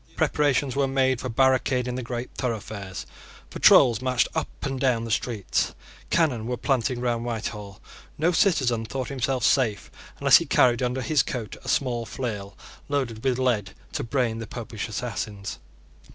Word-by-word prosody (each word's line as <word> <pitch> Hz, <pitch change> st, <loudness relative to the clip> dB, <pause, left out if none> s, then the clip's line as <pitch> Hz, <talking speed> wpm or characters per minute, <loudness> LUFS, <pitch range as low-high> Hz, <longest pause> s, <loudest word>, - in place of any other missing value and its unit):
Preparations 145 Hz, -2 st, +1 dB
were 140 Hz, -1 st, +2 dB
made 130 Hz, -2 st, +1 dB
for 130 Hz, -, -4 dB
barricading 130 Hz, 0 st, +2 dB
the 130 Hz, -, -3 dB
great 120 Hz, 0 st, -5 dB
thoroughfares. 105 Hz, -6 st, -4 dB, 0.5 s
Patrols 120 Hz, -3 st, +6 dB
marched 130 Hz, -1 st, +2 dB
up 160 Hz, -, -1 dB, 0.2 s
and 135 Hz, -2 st, -2 dB
down 125 Hz, -3 st, +2 dB
the 115 Hz, -, -5 dB
streets. 110 Hz, -2 st, -1 dB, 0.3 s
Cannon 130 Hz, -10 st, +1 dB
were 125 Hz, 0 st, -2 dB
planted 130 Hz, -2 st, 0 dB
round 120 Hz, -1 st, -1 dB
Whitehall. 105 Hz, -4 st, -5 dB, 0.4 s
No 165 Hz, +4 st, +2 dB
citizen 130 Hz, -, +2 dB
thought 130 Hz, +4 st, -4 dB
himself 130 Hz, -2 st, -1 dB
safe 115 Hz, -7 st, +2 dB, 0.3 s
unless -, -, +7 dB
he -, -, -3 dB
carried 120 Hz, -1 st, +4 dB
under 125 Hz, +1 st, -1 dB
his 155 Hz, -2 st, +3 dB
coat 115 Hz, -5 st, -5 dB
a -, -, -6 dB
small 120 Hz, -4 st, 0 dB
flail 105 Hz, -4 st, -5 dB, 0.3 s
loaded 130 Hz, -6 st, -2 dB
with 130 Hz, -2 st, +1 dB
lead 120 Hz, -7 st, 0 dB, 0.2 s
to -, -, -3 dB
brain 115 Hz, -2 st, 0 dB
the 115 Hz, -, -6 dB
Popish -, -, -6 dB
assassins. 100 Hz, -2 st, -5 dB
125 Hz, 155 wpm, -25 LUFS, 115-130 Hz, 0.5 s, unless